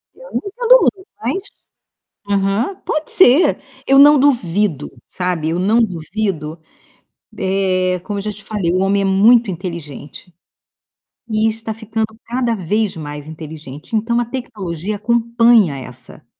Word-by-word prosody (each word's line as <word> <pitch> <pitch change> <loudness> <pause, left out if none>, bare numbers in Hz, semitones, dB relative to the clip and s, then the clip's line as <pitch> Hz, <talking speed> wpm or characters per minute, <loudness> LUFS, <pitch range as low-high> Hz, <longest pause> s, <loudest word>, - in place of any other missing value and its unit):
Eu - - -14
não - - -2
entendo 485 +4 +4
muito 380 0 0
mas 385 - -2 0.9
aham, 200 - 0
pode 310 0 -2
ser. 320 -2 +5 0.3
Eu 270 0 +5
não 290 +1 +8
duvido, 205 - +1 0.2
sabe, 180 -4 -1
eu 170 - -1
não 215 +6 +2
duvido, 170 -4 -3 0.8
eh, 185 -1 0
como 205 -1 -4
eu - - -4
já 210 0 -3
te 205 0 -13
falei, 195 -6 -2
o 185 - +1
homem 195 +1 +1
é - - -1
muito 215 +3 +4
inteligente 170 -2 -8 0.9
e 220 0 +1
está 220 0 -4
ficando 220 0 -3 0.2
cada 240 -1 -1
vez 205 +1 -1
mais 145 -1 -7
inteligente, 155 - -7
então 235 +2 0
a - - 0
tecnologia 210 - -5
acompanha 230 - +3
essa 125 -1 -12
205 Hz, 140 wpm, -18 LUFS, 170-235 Hz, 0.9 s, não